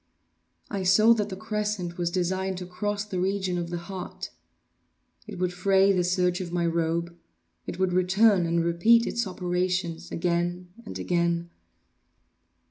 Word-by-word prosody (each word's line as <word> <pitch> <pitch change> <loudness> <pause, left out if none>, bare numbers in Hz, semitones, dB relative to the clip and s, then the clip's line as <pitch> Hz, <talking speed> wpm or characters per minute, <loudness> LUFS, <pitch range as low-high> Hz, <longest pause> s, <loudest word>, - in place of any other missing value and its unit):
I 200 -2 -2
saw 215 +5 +6
that 210 -2 -1
the 190 - -5
crescent 210 -4 -3
was 170 -1 +1
designed 185 +1 -1
to 180 - -6
cross 205 +3 -3
the 190 -3 -4
region 190 -1 0
of 170 -1 -4
the 175 - -3
heart. 180 +2 -7 1.0
It 205 -3 -7
would 180 0 -1
fray 195 +2 +3
the 185 -2 +2
serge 180 0 +1
of 175 -2 -6
my 175 -1 0
robe—it 165 - -4
would 185 -1 +1
return 185 +1 +4
and 170 0 +1
repeat 225 +8 +4
its 235 -2 -1
operations—again—and 180 +1 -2
again. 170 -1 0
180 Hz, 135 wpm, -26 LUFS, 170-195 Hz, 1.0 s, saw